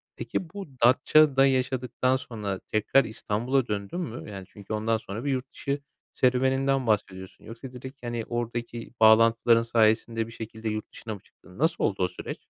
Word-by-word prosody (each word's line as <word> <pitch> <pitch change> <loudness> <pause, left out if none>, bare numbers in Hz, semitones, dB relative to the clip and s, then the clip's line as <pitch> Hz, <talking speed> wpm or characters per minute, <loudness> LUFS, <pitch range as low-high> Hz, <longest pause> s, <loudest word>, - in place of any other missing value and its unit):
Peki, 175 - -4
bu 195 +1 -7 0.2
Datça'da 135 +2 +5
yaşadıktan 130 -1 +1
sonra 105 -7 -4
tekrar 115 +5 +3
İstanbul'a 120 +4 -1
döndün 100 - -3
mü? 120 -10 -6
Yani, 95 -2 -7
çünkü 100 +1 -8
ondan 110 +1 +1
sonra 110 +2 -7
bir 140 - +1
yurt 130 0 -3
dışı 140 +1 -3 0.3
serüveninden 130 +1 +2
bahsediyorsun. 95 -3 -2
Yoksa 115 +4 -9
direkt, 130 +2 -10
hani, 120 -1 -3
oradaki 120 0 -4
bağlantıların 115 +1 +6
sayesinde 115 0 +2
bir - - -11
şekilde 110 0 -6
yurt 110 0 -4
dışına 110 - -7
mı - - -12
çıktın? 90 +1 -19
Nasıl 160 +3 +1
oldu 95 -3 +1
o - - +3
süreç? 90 - -7
115 Hz, 165 wpm, -27 LUFS, 110-130 Hz, 0.3 s, bağlantıların